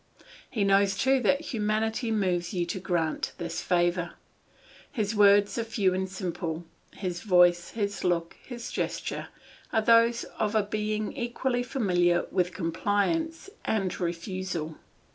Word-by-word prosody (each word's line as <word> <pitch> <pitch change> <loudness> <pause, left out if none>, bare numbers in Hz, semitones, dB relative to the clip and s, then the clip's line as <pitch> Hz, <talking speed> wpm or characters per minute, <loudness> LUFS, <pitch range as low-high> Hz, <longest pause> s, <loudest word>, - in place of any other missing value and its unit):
He 215 -5 -1
knows 195 0 +3
too 265 +5 +3
that 275 +5 +2
humanity 220 +2 0
moves 185 -4 0
you 175 -1 +1
to 175 - -4
grant 170 -4 -1
this 170 -1 -4
favour; 175 0 +1 0.8
his 215 -4 -1
words 205 +1 +5
are - - 0
few 205 -4 +1
and 190 0 -2
simple. 175 -3 -4 0.3
His 180 -3 -4
voice, 175 -3 +4
his 205 -2 -2
look, 170 -2 0
his 240 -2 -7
gesture - - -3 0.4
are 220 -1 +2
those 230 +1 +5 0.2
of 215 0 0
a 215 - +4
being 215 +1 -2
equally 245 0 -1
familiar 180 -9 +1
with 180 -1 +1
compliance 205 - -1 0.2
and 195 -4 -1
refusal. 175 -2 -3
200 Hz, 135 wpm, -28 LUFS, 175-220 Hz, 0.8 s, words